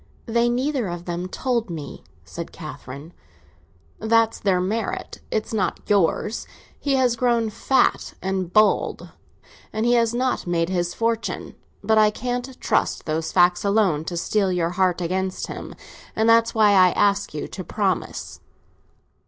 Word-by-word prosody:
"They 235 0 +2
neither 255 -1 0
of 175 0 -6
them 175 +1 -3
told 235 +2 -1
me," 160 -4 -7 0.2
said - - -7
Catherine. 140 +6 -9 0.9
"That's 225 0 +2
their 190 -3 +2
merit; 210 +5 -3
it's 215 +1 -2
not 190 -5 0
yours. 205 +3 +1 0.3
He 280 -2 +1
has 255 -3 +2
grown 235 -2 +1
fat 265 +5 +1
and 190 -2 -2
bald, 215 +1 +2 0.6
and 220 +1 -1
he 240 - +4
has 230 -2 +3
not 250 -4 -1
made 170 -1 0
his 175 -2 -1
fortune. 230 0 -2 0.3
But 220 +1 +3
I 215 0 +6
can't 245 +3 -4
trust - - 0
those 160 0 -2
facts 175 -1 +4
alone 200 -7 +2
to 175 - -4
steel 195 +3 +1
your 175 -2 0
heart 180 -1 +1
against 185 +2 -2
him, - - -8 0.4
and 220 +1 +2
that's 230 0 +4
why 215 -2 +5
I 185 -2 +6
ask 200 -5 +1
you 150 - -4
to 185 - -6
promise." 195 -2 -2
205 Hz, 150 wpm, -23 LUFS, 180-230 Hz, 0.9 s, I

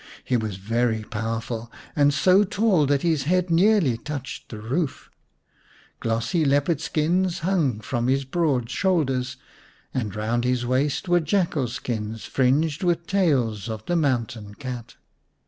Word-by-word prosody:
He 125 - 0
was 110 -4 -1
very 110 +2 0
powerful, 115 +1 -4 0.2
and 145 -1 +4
so 185 +7 +4
tall 195 -6 +2
that 140 0 +1
his 160 -6 +1
head 180 +2 +1
nearly 170 - +4
touched 140 +1 -6
the 110 - -7
roof. 130 +8 -3 0.9
Glossy 115 +8 0
leopard 145 +2 +2
skins 175 +4 0
hung 160 - +1
from 120 +1 -2
his 135 +1 +1
broad 135 -5 0
shoulders, 135 -6 0 0.6
and 110 -7 -2
round 115 +3 -1
his 125 -1 0
waist 135 +7 0
were 175 0 +4
jackal 160 -5 0
skins 110 -2 -4
fringed 140 +4 +1
with 170 -1 +1
tails 125 - +1
of 110 -1 -5
the 175 - 0
mountain 115 -9 -1
cat. 125 -3 -7
135 Hz, 140 wpm, -24 LUFS, 115-165 Hz, 0.9 s, and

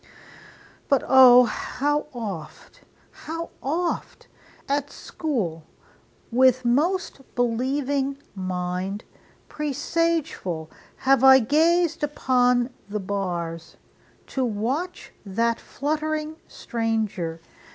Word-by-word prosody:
But 275 -3 +3
O! 255 -1 +9
how 290 +6 -1
oft, 200 -11 -7 0.3
How 330 +1 -6
oft, 335 +6 -3 0.4
at 285 0 -1
school, 205 - -3 0.7
with 255 +1 +4
most 300 +6 +1
believing 265 +3 0 0.2
mind, 185 +1 -3 0.4
Presageful, 295 - -2 0.2
have 270 -1 +2
I 265 0 +9
gazed 325 +6 +2
upon 250 -3 +2 0.2
the 210 +1 -2
bars, 175 -4 -4 0.5
To 265 - -2
watch 255 - -3
that 230 +4 0
fluttering 310 +2 -3
stranger! 215 -8 -2
255 Hz, 80 wpm, -24 LUFS, 205-295 Hz, 0.7 s, O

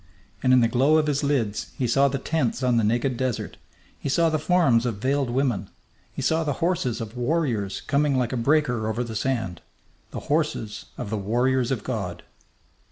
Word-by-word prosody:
And 130 - +3
in 130 -1 +6
the 115 - +4
glow 135 +7 +3
of 155 - +2
his 145 -1 0
lids 125 -8 -1
he 125 - 0
saw 135 +4 +4
the 135 0 -1
tents 135 -3 -1
on 125 -2 +3
the 115 - +2
naked 120 +4 +1
desert; 130 -2 -3 0.4
he - - -3
saw 165 +4 +3
the 155 - +1
forms 145 -8 +3
of 115 - -2
veiled 135 +3 0
women; 120 -6 0 0.4
he - - -5
saw 160 +1 +2
the 145 -2 -1
horses 165 -10 0
of 110 +1 -7
warriors 120 - -1
coming 145 -2 +1
like 125 0 0
a - - 0
breaker 125 -3 +1
over 110 +3 -1
the 115 -2 -6
sand 110 -7 -2 0.5
the - - -6
horses 145 -8 -2
of 100 - -5
the 110 - -1
warriors 120 +5 +1
of 125 -6 -2
God! 90 -9 -4
130 Hz, 195 wpm, -25 LUFS, 115-145 Hz, 0.5 s, in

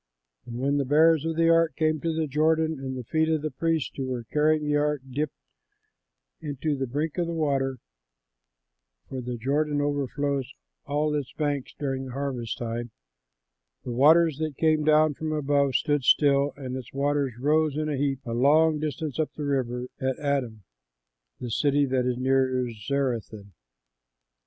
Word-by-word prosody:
And 120 0 -6
when 140 +3 +1
the 140 - +1
bearers 155 +3 +4
of 165 0 -1
the 165 0 +4
ark 165 -1 +3
came 155 -1 0
to 165 - 0
the 160 0 -1
Jordan, 155 +1 +1
and 130 -1 -4
the 125 - -5
feet 160 +6 0
of 155 -2 0
the 155 - -2
priests 160 +2 -1
who 135 -2 -3
were 125 -2 -3
carrying 150 +5 +1
the 150 0 +1
ark 145 -2 0
dipped 145 +3 -3 1.1
in 145 -3 -5
the 140 -4 -1
brink 150 +7 -2
of 170 - 0
the 170 - -3
water 135 -4 0 1.3
for 130 -1 -5
the 125 0 -5
Jordan 145 +5 0
overflows 140 -2 -1 0.4
all 150 +1 0
its 145 -4 -3
banks 145 -3 -2
during 135 -2 -3
the 130 - -8
harvest 130 -4 -3
time 120 0 -4 0.9
the 125 - -5
waters 155 +4 +4
that 155 -3 -3
came 155 -1 +2
down 155 0 +4
from 155 +2 -4
above 140 -3 +1
stood 145 0 +1
still 140 +1 +4
and 130 -2 -5
its 130 -3 -7
waters 140 -2 0
rose 150 +2 +2
in 155 0 -1
a 150 - -1
heap 135 -1 -1
a 115 - -5
long 150 +5 +4
distance 155 -1 -4
up 155 - 0
the 150 - -4
river 125 -3 -1
at 130 -1 -1
Adam, 130 -7 -2 0.8
the 120 -2 -5
city 145 +3 +2
that 130 -1 0
is 125 -1 -1
near 130 -1 +1
Zarethan. 110 -4 -3
145 Hz, 170 wpm, -26 LUFS, 130-155 Hz, 1.3 s, bearers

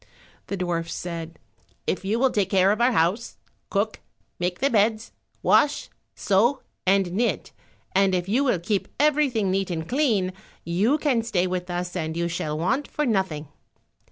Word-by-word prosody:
The 200 - -3
dwarfs 170 -2 -2
said, 165 -2 -6 0.5
"If 190 - -1
you 205 +4 0
will 260 +1 +3
take 200 -3 0
care 195 0 +4
of 215 +3 0
our 245 +2 +5
house, 190 +4 0 0.3
cook, 210 +2 -1 0.4
make 180 0 -1
the 275 - +1
beds, 220 +1 +2 0.3
wash, 290 - +3 0.2
sew, 225 +8 +2 0.2
and 190 -2 +3
knit, 230 +6 -1 0.4
and 195 -1 +3
if 180 0 -1
you 240 +8 +2
will 250 -9 +2
keep 190 +4 -1
everything 275 -9 +2
neat 195 0 0
and 160 -2 -3
clean, 225 -10 +1 0.3
you 200 - +2
can 280 -6 +1
stay 205 -6 0
with 180 0 -3
us 175 +1 -3
and 160 -2 -3
you 170 0 0
shall 155 -3 -3
want 250 - 0
for 300 - -2
nothing." 190 - -1
195 Hz, 165 wpm, -25 LUFS, 175-235 Hz, 0.5 s, our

